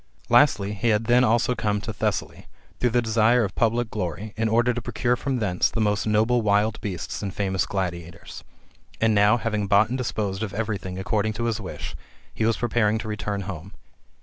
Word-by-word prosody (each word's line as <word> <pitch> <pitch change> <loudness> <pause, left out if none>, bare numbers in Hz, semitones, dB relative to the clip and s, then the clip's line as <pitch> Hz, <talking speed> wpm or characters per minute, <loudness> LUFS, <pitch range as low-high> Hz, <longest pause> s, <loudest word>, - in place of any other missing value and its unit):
Lastly, 115 -5 +4
he 115 +3 0
had 105 0 +2
then 120 +2 +4
also 120 +1 +2
come 105 -3 -1
to 110 - -5
Thessaly, - - -3 0.3
through 125 - +2
the 120 +1 +1
desire 115 +2 +3
of 100 -2 -3
public 115 0 0
glory, 105 +2 -4
in 115 0 0
order 120 +2 +3
to 120 - -4
procure 120 +2 0
from 135 +1 -2
thence 100 -6 +1
the 115 - -4
most 105 0 +1
noble 110 +3 +2
wild 105 +1 +1
beasts 90 -5 -5
and 100 -2 -3
famous 95 -1 -1
gladiators. 85 -3 -5 0.6
And 110 0 +3
now, 105 +2 +4
having 105 -3 -2
bought 100 +1 +4
and 130 - -2
disposed 105 -5 -2
of 100 -3 -4
every 110 -2 -2
thing 90 0 -7
according 105 +2 -1
to 115 +3 -4
his 115 -2 -1
wish, 95 - -7 0.4
he 110 - -1
was 115 - +1
preparing 110 -2 +1
to 110 - -6
return 105 -1 -3
home. 95 0 -7
110 Hz, 200 wpm, -24 LUFS, 100-115 Hz, 0.6 s, Lastly